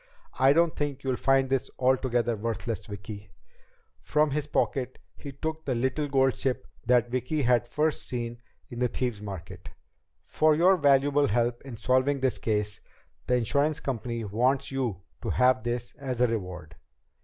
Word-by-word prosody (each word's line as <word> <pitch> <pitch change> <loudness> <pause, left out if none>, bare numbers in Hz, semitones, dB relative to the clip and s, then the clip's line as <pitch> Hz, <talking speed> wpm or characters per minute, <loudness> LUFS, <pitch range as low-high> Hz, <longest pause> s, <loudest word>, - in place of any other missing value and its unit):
I 135 +1 +6
don't 165 +2 +3
think 145 -2 -3
you'll 130 -2 0
find 135 +1 +3
this 135 -1 -1
altogether 125 -2 +1
worthless, 110 0 -4
Vicki." 100 0 -8 0.7
From 150 0 +1
his 150 +1 -1
pocket 130 -3 -1 0.2
he 140 - -8
took 160 +3 -4
the 130 - -1
little 130 +5 0
golden 135 -2 +2
ship 130 -2 -1 0.2
that 120 -1 +3
Vicki 130 +4 -1
had 120 -1 +3
first 150 +4 0
seen 120 -1 -4 0.3
in 120 - -6
the 125 - +2
Thieves' 120 -3 -3
Market. 95 -3 -8 0.5
"For 155 -1 +3
your 180 +5 +5
invaluable 145 -3 +3
help 120 +2 0
in 130 -4 -9
solving 130 +4 +2
this 130 -1 0
case, 105 -2 -1 0.5
the 125 - +3
insurance 140 +6 +1
company 120 -4 -3
wants 125 +8 0
you 120 -9 -2 0.2
to - - -3
have 125 -2 +3
this 120 +1 -3
as 130 -3 -4
a 125 - +5
reward." 90 -8 -4
125 Hz, 160 wpm, -27 LUFS, 115-140 Hz, 0.7 s, I